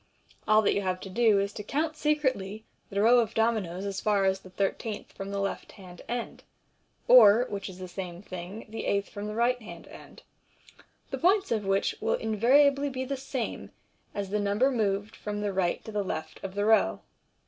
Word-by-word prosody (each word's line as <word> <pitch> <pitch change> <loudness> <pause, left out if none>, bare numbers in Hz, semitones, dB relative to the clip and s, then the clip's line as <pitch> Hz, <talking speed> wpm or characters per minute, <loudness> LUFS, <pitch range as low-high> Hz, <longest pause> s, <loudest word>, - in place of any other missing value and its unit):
All 215 0 +5
that - - +3
you 200 - 0
have 185 -1 -1
to 195 - -8
do 225 0 +4
is 200 +1 -2
to - - -6
count 310 +8 -1
secretly 260 -10 -1 0.3
the 200 0 0
row 240 +2 +6
of 225 -4 -1
dominoes 210 -5 0
as 195 -1 -3
far 205 -2 +2
as 190 0 +1
the 185 - -14
thirteenth 205 +3 -3
from 195 0 -7
the 200 0 -3
left 195 0 -4
hand 180 -3 -12
end, 240 0 -4 0.7
or 235 -1 +8
(which 200 -1 -5
is 185 - -10
the 185 0 -7
same 180 0 -7
thing) 185 +3 -8
the 225 +1 -6
eighth 200 0 0
from 205 +1 -6
the 210 - -5
right 245 +2 +1
hand 220 - -11
end, - - -14 0.9
the - - -3
points 385 0 +3
of 215 -3 0
which 195 0 +1
will - - +1
invariably 275 +6 +3
be 260 -1 -4
the 275 +1 -2
same 265 -2 -4 0.5
as 200 -1 -4
the 210 - +1
number 205 +7 +2
moved 205 -3 -1
from 210 0 -5
the 205 -1 -2
right 185 -2 -1
to 220 - -7
the 210 -1 -1
left 160 -4 -6
of 195 0 -6
the 205 0 0
row. 220 0 +3
210 Hz, 205 wpm, -28 LUFS, 195-235 Hz, 0.9 s, or